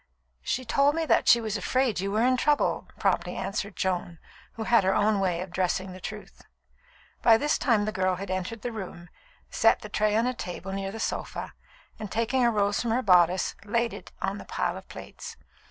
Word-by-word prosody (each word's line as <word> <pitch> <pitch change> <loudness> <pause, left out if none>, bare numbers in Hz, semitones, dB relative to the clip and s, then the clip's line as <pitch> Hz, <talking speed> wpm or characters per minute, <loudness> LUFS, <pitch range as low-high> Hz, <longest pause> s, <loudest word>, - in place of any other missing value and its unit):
"She 255 - -2
told 280 +5 +3
me 325 0 0
that - - +2
she 235 - +7
was 220 -2 -2
afraid 250 +1 0
you 195 +1 -2
were 215 +3 +2
in 255 0 +4
trouble," 295 +3 +1
promptly - - 0
answered 200 0 -3
Joan, 180 -2 -2 0.4
who 225 - -5
had 235 -2 +4
her 190 +1 +2
own 210 0 +2
way 180 -3 0
of 185 -1 -7
dressing 185 +1 -1
the 185 0 -10
truth. - - -8 0.8
By 225 -1 +6
this 295 +6 0
time 230 -5 +2
the 215 - -1
girl 185 -2 0
had 190 +1 -6
entered 185 +4 -4
the 245 - -2
room, 180 -5 -8 0.4
set - - +3
the - - -8
tray 215 0 +1
on 225 +2 +2
a 250 - 0
table 190 -4 -6
near 195 0 -3
the 225 - -7
sofa, - - -4 0.5
and 215 -3 -6
taking 235 +3 +1
a 240 - +5
rose 205 -2 +1
from 240 - -2
her 245 +3 +1
bodice, 180 -1 +4
laid 230 +2 0
it - - -10
on - - -2
the - - -10
pile - - -2
of - - -11
plates. 470 -2 -9
210 Hz, 210 wpm, -27 LUFS, 185-235 Hz, 0.8 s, she